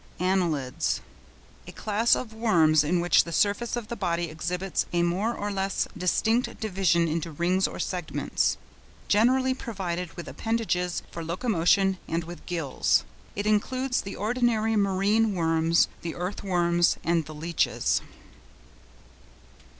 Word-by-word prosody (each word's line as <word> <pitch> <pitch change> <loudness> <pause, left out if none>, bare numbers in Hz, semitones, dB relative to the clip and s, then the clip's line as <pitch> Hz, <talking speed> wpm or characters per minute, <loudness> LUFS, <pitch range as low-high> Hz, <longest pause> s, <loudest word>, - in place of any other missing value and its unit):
ANNELIDS.—A 170 -8 -3
class 215 +2 +2
of 220 -3 -5
worms 165 -9 +4
in 170 +4 +1
which 175 - +4
the 170 - -8
surface 205 +8 +1
of 240 -3 -5
the 235 - -4
body 170 -5 -1
exhibits 180 +4 -2
a 175 0 +1
more 185 +7 0
or 205 0 -3
less 195 0 -1
distinct 220 +6 0
division 180 -5 +2
into 165 +1 -2
rings 180 +5 +1
or - - -8
segments, 180 -4 -1 0.5
generally 255 +5 +3
provided 180 -8 -4
with 175 - -7
appendages 210 -6 -1
for 170 - -6
locomotion 185 +1 +1
and 165 +1 -1
with 170 +1 -10
gills. 165 -7 +1 0.3
It 205 - -3
includes 250 +5 +1
the 195 - -7
ordinary 225 0 +1
marine 205 +2 +2
worms, 165 0 +3
the 165 -1 -5
earth 180 +3 -4
worms, 175 -2 +2
and 170 -1 +1
the 155 - -9
leeches. 165 +2 0
185 Hz, 130 wpm, -26 LUFS, 170-215 Hz, 0.5 s, worms